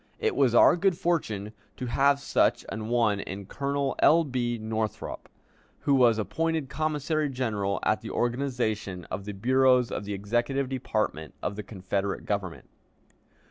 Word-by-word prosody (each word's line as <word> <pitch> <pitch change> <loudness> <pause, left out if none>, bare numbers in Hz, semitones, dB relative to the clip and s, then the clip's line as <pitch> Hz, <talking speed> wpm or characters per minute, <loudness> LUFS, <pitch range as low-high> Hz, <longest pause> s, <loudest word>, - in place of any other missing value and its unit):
It - - 0
was 130 -4 +3
our - - +7
good 185 -1 +2
fortune 110 - -1 0.2
to 125 - -4
have 140 +3 +3
such - - +1
an 110 0 -5
one 115 -4 +2
in 100 0 -6
Colonel 140 +4 -2
L. 165 +2 +6
B. 125 -4 -2
Northrop, 110 0 -4 0.5
who 140 - +2
was 120 -4 +5
appointed 160 - -1
commissary 155 0 -1
general 110 -7 -1
at - - +1
the - - -7
organization 120 -8 -2
of 95 +1 -4
the 105 - -5
bureaus 125 +3 +3
of 105 - -4
the 100 0 -3
executive 120 +7 -1
department 110 - -2
of 100 - -2
the 105 - -4
Confederate 100 -1 -3
Government. 100 -4 -3
120 Hz, 150 wpm, -27 LUFS, 105-140 Hz, 0.5 s, our